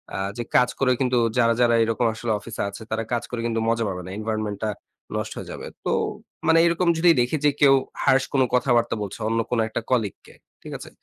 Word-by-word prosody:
আ -, -, -2 dB, 0.2 s
যে 120 Hz, -, -2 dB
কাজ 125 Hz, -, +5 dB
করে 135 Hz, -2 st, +3 dB
কিন্তু 125 Hz, -1 st, +2 dB, 0.2 s
যারা, 115 Hz, -1 st, +4 dB
যারা 120 Hz, -1 st, +4 dB
এরকম 115 Hz, +1 st, 0 dB
আসলে 115 Hz, +1 st, -3 dB
অফিসে 115 Hz, +1 st, -6 dB
আছে, 100 Hz, -, -10 dB
তারা 110 Hz, +1 st, -1 dB
কাজ 120 Hz, 0 st, 0 dB
করে 120 Hz, -2 st, -4 dB
কিন্তু 115 Hz, -1 st, 0 dB
মজা 115 Hz, 0 st, +1 dB
পাবে 90 Hz, -2 st, -4 dB
না। -, -, -8 dB
এনভায়রনমেন্টটা 110 Hz, -1 st, -3 dB, 0.5 s
নষ্ট -, -, -3 dB
হয়ে -, -, -7 dB
যাবে। -, -, -7 dB, 0.2 s
তো -, -, +1 dB, 0.6 s
মানে 165 Hz, 0 st, +6 dB
এরকম 170 Hz, +1 st, +1 dB
যদি 175 Hz, +2 st, +4 dB
দেখি 125 Hz, +6 st, 0 dB
যে 145 Hz, -, +7 dB
কেউ 140 Hz, -1 st, +7 dB, 0.3 s
harsh 130 Hz, -1 st, +4 dB
কোন 135 Hz, -, +3 dB
কথাবার্তা 120 Hz, -2 st, +2 dB
বলছে 100 Hz, +1 st, -7 dB
অন্য 115 Hz, 0 st, 0 dB
কোন 120 Hz, -, +1 dB
একটা 110 Hz, -, -3 dB
কলিগকে, 110 Hz, -6 st, -1 dB, 0.3 s
ঠিক -, -, -10 dB
আছে? -, -, -10 dB
120 Hz, 210 wpm, -24 LUFS, 110-130 Hz, 0.6 s, যে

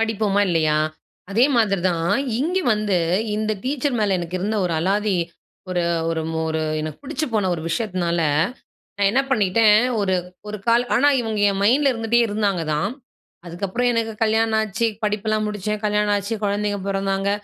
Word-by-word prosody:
படிப்போமா? 215 Hz, -2 st, +1 dB
இல்லயா? 155 Hz, -3 st, +2 dB, 0.5 s
அதே 230 Hz, +6 st, +4 dB
மாதிரி 200 Hz, -5 st, +2 dB
தான். 165 Hz, 0 st, 0 dB, 0.3 s
இங்க 355 Hz, +6 st, 0 dB, 0.2 s
வந்து, 210 Hz, -3 st, 0 dB, 0.4 s
இந்த 215 Hz, 0 st, -1 dB
டீச்சர் 275 Hz, -1 st, -1 dB
மேல 200 Hz, -3 st, +2 dB
எனக்கு 175 Hz, +1 st, -4 dB
இருந்த 215 Hz, +3 st, -1 dB
ஒரு 175 Hz, -, -1 dB
அலாதி, 200 Hz, +3 st, +1 dB, 0.5 s
ஒரு 180 Hz, -1 st, 0 dB, 0.3 s
ஒரு 160 Hz, -1 st, -1 dB
மொ 160 Hz, -, -2 dB
ஒரு 160 Hz, 0 st, -1 dB, 0.2 s
எனக்கு 155 Hz, -1 st, -5 dB
பிடிச்சு 305 Hz, +2 st, -3 dB
போன 205 Hz, -3 st, +1 dB
ஒரு 160 Hz, -, -6 dB
விஷயத்தினால, 180 Hz, -4 st, -1 dB, 0.8 s
நான் 200 Hz, -1 st, +3 dB
என்ன 270 Hz, +3 st, +3 dB
பண்ணிட்டேன், 215 Hz, -2 st, +4 dB, 0.2 s
ஒரு 190 Hz, -2 st, +1 dB, 0.3 s
ஒரு 210 Hz, 0 st, -5 dB
கால் 235 Hz, +1 st, +4 dB
ஆனா, 285 Hz, +5 st, +4 dB
இவங்க 220 Hz, -3 st, -2 dB
என் 195 Hz, 0 st, -3 dB
மைண்ட்ல 270 Hz, +5 st, +4 dB
இருந்துட்டே 230 Hz, 0 st, +1 dB
இருந்தாங்க 205 Hz, -4 st, 0 dB
தான். 190 Hz, +8 st, -1 dB, 0.6 s
அதுக்கு 175 Hz, +4 st, -4 dB
அப்புறம் 245 Hz, +6 st, 0 dB
எனக்கு 225 Hz, -1 st, -1 dB
கல்யாணம் 220 Hz, 0 st, +2 dB
ஆச்சு, 220 Hz, +2 st, -1 dB, 0.2 s
படிப்பெல்லாம் 215 Hz, +1 st, 0 dB
முடிச்சேன், 210 Hz, 0 st, -3 dB
கல்யாணம் 210 Hz, 0 st, +2 dB
ஆச்சு, 200 Hz, +3 st, -3 dB
குழந்தைகள் 205 Hz, -1 st, -1 dB
பொறந்தாங்க. 195 Hz, 0 st, -1 dB
210 Hz, 160 wpm, -22 LUFS, 190-225 Hz, 0.8 s, அதே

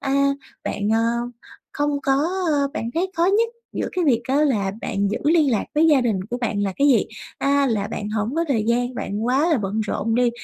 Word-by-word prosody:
à, 280 Hz, +1 st, +2 dB, 0.4 s
bạn, 205 Hz, +1 st, -2 dB
ờ, 225 Hz, -, +2 dB, 0.7 s
không 290 Hz, -1 st, -1 dB
có 270 Hz, -, +2 dB, 0.4 s
ờ, 280 Hz, -1 st, +1 dB
bạn 230 Hz, -5 st, -3 dB
thấy 365 Hz, +3 st, 0 dB
khó 335 Hz, -, +3 dB
nhất 440 Hz, +4 st, +3 dB, 0.2 s
giữa -, -, -2 dB
cái 360 Hz, -2 st, 0 dB
việc 240 Hz, -5 st, +3 dB
á, 270 Hz, -, +2 dB
là 205 Hz, -9 st, 0 dB
bạn 200 Hz, -3 st, -1 dB
giữ -, -, -1 dB
liên 310 Hz, -2 st, +4 dB
lạc 220 Hz, -, 0 dB
với 315 Hz, +2 st, +4 dB
gia 295 Hz, -4 st, +5 dB
đình 220 Hz, -6 st, 0 dB
của 245 Hz, -, -1 dB
bạn 210 Hz, -4 st, -1 dB
là 195 Hz, -1 st, -1 dB
cái 285 Hz, +1 st, +3 dB
gì? 255 Hz, -, +4 dB, 0.3 s
À, 280 Hz, 0 st, +2 dB
là 210 Hz, -4 st, -1 dB
bạn 210 Hz, -, -4 dB
hổng 215 Hz, +5 st, -2 dB
có 335 Hz, -, +1 dB
thời 225 Hz, -6 st, +1 dB
gian, 245 Hz, +2 st, 0 dB
bạn 210 Hz, -1 st, -3 dB
quá 275 Hz, +7 st, +2 dB
là 310 Hz, -, +3 dB
bận 210 Hz, +2 st, -2 dB
rộn 220 Hz, +1 st, -1 dB
đi, 245 Hz, 0 st, +3 dB
245 Hz, 230 wpm, -22 LUFS, 215-290 Hz, 0.7 s, gia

